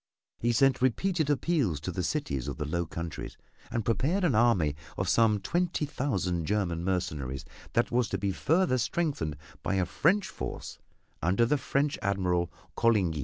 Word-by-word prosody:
He 120 Hz, -, +2 dB
sent 135 Hz, +3 st, +3 dB
repeated 155 Hz, +5 st, +1 dB
appeals 140 Hz, -, +1 dB
to -, -, -3 dB
the -, -, -2 dB
cities 65 Hz, -3 st, -2 dB
of -, -, -4 dB
the 75 Hz, -, -2 dB
Low 85 Hz, +2 st, -1 dB
Countries, 85 Hz, -1 st, -6 dB, 0.3 s
and 115 Hz, -3 st, -2 dB
prepared 150 Hz, -, +1 dB
an 165 Hz, -7 st, +3 dB
army 105 Hz, -10 st, +3 dB, 0.2 s
of 95 Hz, -, -1 dB
some 110 Hz, +2 st, +4 dB
twenty 170 Hz, -, 0 dB
thousand 95 Hz, -, -1 dB
German 90 Hz, -5 st, 0 dB
mercenaries 75 Hz, -8 st, -2 dB, 0.3 s
that 120 Hz, -, +2 dB
was 120 Hz, -1 st, +2 dB
to -, -, -1 dB
be 100 Hz, -1 st, -1 dB
further 155 Hz, -, +2 dB
strengthened 120 Hz, -, -1 dB, 0.2 s
by 95 Hz, -, -1 dB
a 95 Hz, -1 st, +2 dB
French 170 Hz, -, +2 dB
force -, -, -6 dB, 0.4 s
under 95 Hz, +8 st, +3 dB
the 145 Hz, +4 st, +1 dB
French 140 Hz, +2 st, 0 dB
Admiral 90 Hz, -3 st, 0 dB, 0.2 s
Coligny. 100 Hz, -9 st, +2 dB
110 Hz, 165 wpm, -29 LUFS, 85-140 Hz, 0.4 s, some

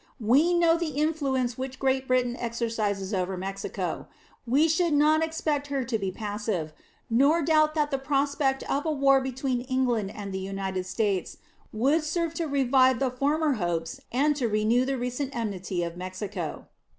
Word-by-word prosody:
We 280 Hz, +10 st, +4 dB
know 335 Hz, -1 st, +4 dB
the 310 Hz, -5 st, -3 dB
influence 270 Hz, -6 st, 0 dB
which 260 Hz, 0 st, -5 dB
Great 265 Hz, 0 st, 0 dB
Britain 250 Hz, -1 st, +1 dB
exercises 225 Hz, -4 st, -2 dB
over 185 Hz, 0 st, -1 dB
Mexico; 195 Hz, +2 st, -4 dB, 0.4 s
we 280 Hz, +7 st, +4 dB
should 325 Hz, 0 st, +2 dB
not 305 Hz, +2 st, +4 dB
expect 310 Hz, -3 st, -1 dB
her 275 Hz, -2 st, -1 dB
to 235 Hz, -2 st, -1 dB
be 195 Hz, -2 st, -2 dB
passive, 205 Hz, -6 st, -3 dB, 0.3 s
nor 280 Hz, +8 st, +3 dB
doubt 310 Hz, 0 st, +3 dB
that 300 Hz, -1 st, +1 dB
the 275 Hz, -, 0 dB
prospect 275 Hz, 0 st, 0 dB
of 280 Hz, -, -1 dB
a -, -, +2 dB
war 275 Hz, -2 st, +4 dB
between 260 Hz, -1 st, -2 dB
England 250 Hz, -5 st, 0 dB
and 200 Hz, -1 st, -7 dB
the 190 Hz, -, -2 dB
United 190 Hz, -1 st, -3 dB
States 195 Hz, -1 st, -1 dB, 0.3 s
would 275 Hz, +9 st, +2 dB
serve 330 Hz, +1 st, -1 dB
to 330 Hz, -1 st, -2 dB
revive 260 Hz, -2 st, +3 dB
the 260 Hz, +1 st, 0 dB
former 295 Hz, +4 st, +1 dB
hopes 165 Hz, -1 st, -2 dB
and 290 Hz, +4 st, +2 dB
to 250 Hz, -5 st, 0 dB
renew 220 Hz, +4 st, +2 dB
the 270 Hz, 0 st, -1 dB
recent 250 Hz, +3 st, -3 dB
enmity 190 Hz, -5 st, -2 dB
of 170 Hz, 0 st, -4 dB
Mexico. 185 Hz, -1 st, -5 dB
255 Hz, 165 wpm, -27 LUFS, 210-290 Hz, 0.4 s, We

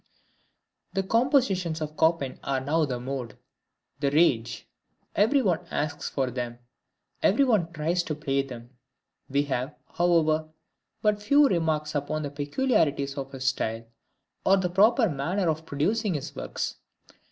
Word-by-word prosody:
The 195 Hz, -, 0 dB
compositions 200 Hz, -, +2 dB
of 155 Hz, -1 st, -4 dB
Chopin 160 Hz, -5 st, +1 dB
are 135 Hz, -1 st, 0 dB
now 155 Hz, +4 st, +1 dB
the 125 Hz, -3 st, -3 dB
mode, 125 Hz, -2 st, -5 dB, 0.6 s
the 140 Hz, -1 st, +1 dB
rage. 120 Hz, -7 st, +2 dB, 0.5 s
Every 245 Hz, +7 st, +3 dB
one 180 Hz, -6 st, +1 dB
asks 150 Hz, 0 st, -2 dB
for 130 Hz, -2 st, -1 dB
them, 120 Hz, -1 st, -4 dB, 0.6 s
every 230 Hz, +8 st, +4 dB
one 205 Hz, -10 st, +2 dB
tries 165 Hz, +3 st, 0 dB
to 155 Hz, -, -2 dB
play 140 Hz, -2 st, 0 dB
them. 125 Hz, -3 st, -9 dB, 0.6 s
We 140 Hz, +1 st, +2 dB
have, 135 Hz, 0 st, -3 dB, 0.2 s
however, 160 Hz, -3 st, +2 dB, 0.5 s
but 210 Hz, -1 st, +2 dB
few 285 Hz, +7 st, +5 dB
remarks 160 Hz, -, 0 dB
upon 150 Hz, +1 st, -2 dB
the 145 Hz, -, -4 dB
peculiarities 145 Hz, -, 0 dB
of 135 Hz, -1 st, -5 dB
his 130 Hz, -1 st, -6 dB
style, 115 Hz, -4 st, -1 dB, 0.6 s
or 195 Hz, -, +5 dB
the 180 Hz, -2 st, -1 dB
proper 220 Hz, +6 st, +5 dB
manner 175 Hz, +5 st, -1 dB
of 160 Hz, 0 st, -1 dB
producing 200 Hz, +7 st, 0 dB
his 140 Hz, -, -5 dB
works. -, -, -4 dB
155 Hz, 140 wpm, -27 LUFS, 140-185 Hz, 0.6 s, few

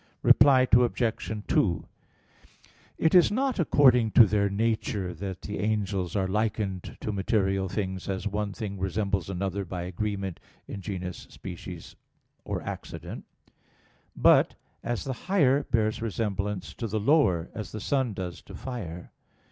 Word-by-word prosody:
Reply 130 Hz, -2 st, +6 dB
Obj. 120 Hz, -2 st, +2 dB, 0.2 s
2: 85 Hz, -6 st, +1 dB, 1.1 s
It 160 Hz, -, +2 dB
is 180 Hz, -2 st, +6 dB
not 260 Hz, +1 st, 0 dB
according 130 Hz, -8 st, +5 dB
to 115 Hz, -, +9 dB
their 100 Hz, -1 st, +1 dB
nature 105 Hz, -3 st, -1 dB
that 95 Hz, +2 st, -6 dB
the 105 Hz, -, -5 dB
angels 100 Hz, -3 st, -1 dB
are 95 Hz, -2 st, +1 dB
likened 100 Hz, -2 st, -2 dB
to 110 Hz, -, -2 dB
material 95 Hz, -2 st, 0 dB
things, 95 Hz, -1 st, -3 dB
as 95 Hz, 0 st, -3 dB
one 105 Hz, 0 st, -2 dB
thing 100 Hz, -2 st, -5 dB
resembles 95 Hz, 0 st, -1 dB
another 95 Hz, +1 st, -2 dB
by 90 Hz, -1 st, -5 dB
agreement 95 Hz, 0 st, -3 dB, 0.3 s
in 100 Hz, -, -6 dB
genus, 90 Hz, -3 st, -5 dB
species, -, -, -9 dB, 0.5 s
or -, -, -4 dB
accident; -, -, -7 dB, 0.9 s
but -, -, +5 dB, 0.3 s
as 120 Hz, -1 st, -2 dB
the 135 Hz, -, -3 dB, 0.2 s
higher 145 Hz, -8 st, +3 dB
bears 110 Hz, -1 st, 0 dB
resemblance 105 Hz, -3 st, -2 dB
to 115 Hz, -, -4 dB
the 110 Hz, +1 st, -1 dB
lower, 100 Hz, -, +3 dB
as 105 Hz, -, -6 dB
the 110 Hz, -, -5 dB
sun 130 Hz, -1 st, 0 dB
does 90 Hz, -2 st, -5 dB
to -, -, -11 dB
fire. 90 Hz, -10 st, -6 dB
105 Hz, 140 wpm, -27 LUFS, 95-115 Hz, 1.1 s, to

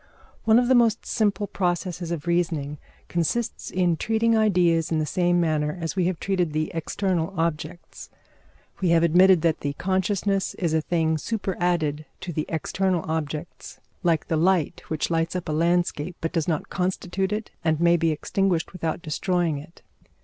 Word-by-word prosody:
One 220 Hz, 0 st, +6 dB
of 245 Hz, 0 st, +3 dB
the 260 Hz, -, +4 dB
most 235 Hz, -3 st, +3 dB
simple 205 Hz, -1 st, 0 dB
processes 180 Hz, -2 st, -2 dB
of 170 Hz, -2 st, -4 dB
reasoning 160 Hz, -4 st, -1 dB, 0.3 s
consists 175 Hz, +8 st, -1 dB
in 180 Hz, -3 st, +1 dB
treating 225 Hz, +4 st, +2 dB
ideas 175 Hz, -7 st, +3 dB
in 160 Hz, -, +2 dB
the 155 Hz, -, 0 dB
same 175 Hz, +3 st, +1 dB
manner 155 Hz, -1 st, 0 dB
as 165 Hz, +1 st, -3 dB
we 185 Hz, -3 st, +1 dB
have 185 Hz, -3 st, -2 dB
treated 180 Hz, -5 st, 0 dB
the 155 Hz, 0 st, -1 dB
external 170 Hz, +1 st, -1 dB
objects. 165 Hz, +1 st, -4 dB, 0.7 s
We 185 Hz, -, +1 dB
have 165 Hz, 0 st, +4 dB
admitted 180 Hz, +1 st, +5 dB
that 165 Hz, -1 st, +2 dB
the 145 Hz, 0 st, -2 dB
consciousness 190 Hz, +3 st, 0 dB
is 170 Hz, -4 st, -1 dB
a 160 Hz, -, +2 dB
thing 160 Hz, -1 st, 0 dB
superadded 175 Hz, -6 st, -1 dB
to 175 Hz, -, -5 dB
the 155 Hz, 0 st, -2 dB
external 180 Hz, +2 st, 0 dB
objects, 155 Hz, 0 st, -5 dB, 0.2 s
like 170 Hz, -4 st, +1 dB
the 160 Hz, -, 0 dB
light 175 Hz, -1 st, +1 dB
which 155 Hz, +1 st, -2 dB
lights 165 Hz, +1 st, 0 dB
up 180 Hz, -, -3 dB
a -, -, -2 dB
landscape, 170 Hz, 0 st, 0 dB
but 165 Hz, -, -3 dB
does 165 Hz, -4 st, 0 dB
not 160 Hz, -4 st, -2 dB
constitute 190 Hz, +1 st, -1 dB
it 210 Hz, +1 st, -3 dB
and 160 Hz, -2 st, +1 dB
may 170 Hz, 0 st, +5 dB
be 165 Hz, -1 st, +2 dB
extinguished 175 Hz, +3 st, 0 dB
without 165 Hz, -2 st, -3 dB
destroying 170 Hz, 0 st, 0 dB
it. 160 Hz, +4 st, -15 dB
170 Hz, 170 wpm, -25 LUFS, 160-185 Hz, 0.7 s, One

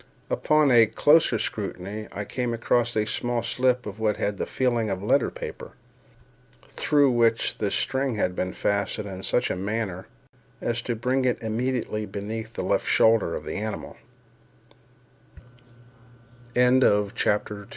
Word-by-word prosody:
Upon 150 Hz, -2 st, +3 dB
a 115 Hz, -2 st, +6 dB
closer 150 Hz, -3 st, +4 dB
scrutiny, 105 Hz, 0 st, -4 dB
I 105 Hz, -, -5 dB
came 120 Hz, 0 st, -2 dB
across 120 Hz, +1 st, +1 dB
a 105 Hz, -, +2 dB
small 120 Hz, +1 st, -1 dB
slip 125 Hz, +1 st, +1 dB
of 105 Hz, 0 st, -7 dB
what 110 Hz, -2 st, 0 dB
had 100 Hz, -1 st, -2 dB
the -, -, -2 dB
feeling 120 Hz, -4 st, 0 dB
of 95 Hz, 0 st, -3 dB
letter 105 Hz, -, +2 dB
paper, -, -, -8 dB, 0.9 s
through 145 Hz, -3 st, +2 dB
which 115 Hz, -1 st, +1 dB
the 105 Hz, -, 0 dB
string 130 Hz, +3 st, 0 dB
had 90 Hz, -3 st, -1 dB
been 90 Hz, 0 st, -2 dB
fastened 100 Hz, +1 st, -1 dB
in 95 Hz, -1 st, -7 dB
such 125 Hz, -, +1 dB
a -, -, -1 dB
manner 95 Hz, -1 st, -3 dB, 0.5 s
as 120 Hz, 0 st, -1 dB
to 120 Hz, -, -2 dB
bring 125 Hz, +4 st, 0 dB
it 125 Hz, -, +1 dB
immediately 110 Hz, -1 st, -2 dB
beneath 110 Hz, +3 st, -6 dB
the -, -, -4 dB
left -, -, 0 dB
shoulder 110 Hz, -7 st, +3 dB
of -, -, -6 dB
the -, -, -4 dB
animal. 110 Hz, +1 st, -5 dB
110 Hz, 140 wpm, -25 LUFS, 105-125 Hz, 0.9 s, a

